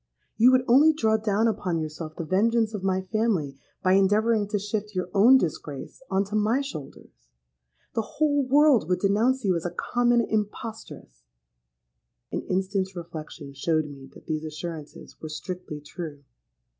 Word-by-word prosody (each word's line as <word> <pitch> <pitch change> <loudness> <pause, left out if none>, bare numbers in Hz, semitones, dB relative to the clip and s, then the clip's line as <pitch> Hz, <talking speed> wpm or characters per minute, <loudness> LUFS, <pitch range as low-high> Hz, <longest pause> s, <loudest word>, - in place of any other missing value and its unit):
You 240 +4 +6
would 255 0 +3
only 285 +6 +6
draw 220 -7 +2
down 215 +1 +1
upon 195 -6 -1
yourself 155 0 -5
the 165 - -5
vengeance 220 +5 +2
of 210 - -4
my 190 0 0
family 185 -10 -1 0.2
by 185 - +4
endeavouring 205 +2 +3
to 205 0 -1
shift 210 0 -4
your 180 -1 -2
own 230 +7 +7
disgrace 150 - -4
on 195 0 +2
to 200 +1 -10
my 215 +5 +2
shoulders. 135 - -10 0.6
The 225 - 0
whole 290 +5 0
world 270 - +4
would 180 - +2
denounce 220 +6 +2
you 185 -2 +3
as 165 - -2
a 175 - -1
common 240 +6 +1
impostress.'—An - - -7
instant's 190 0 -1
reflection 155 -4 -8
showed 155 +3 0
me 140 -2 -11
that - - -15
these 155 -1 -3
assurances 155 0 -8
were 155 - -6
strictly 175 -1 -6
true. 150 -1 -8
190 Hz, 155 wpm, -26 LUFS, 155-220 Hz, 0.6 s, own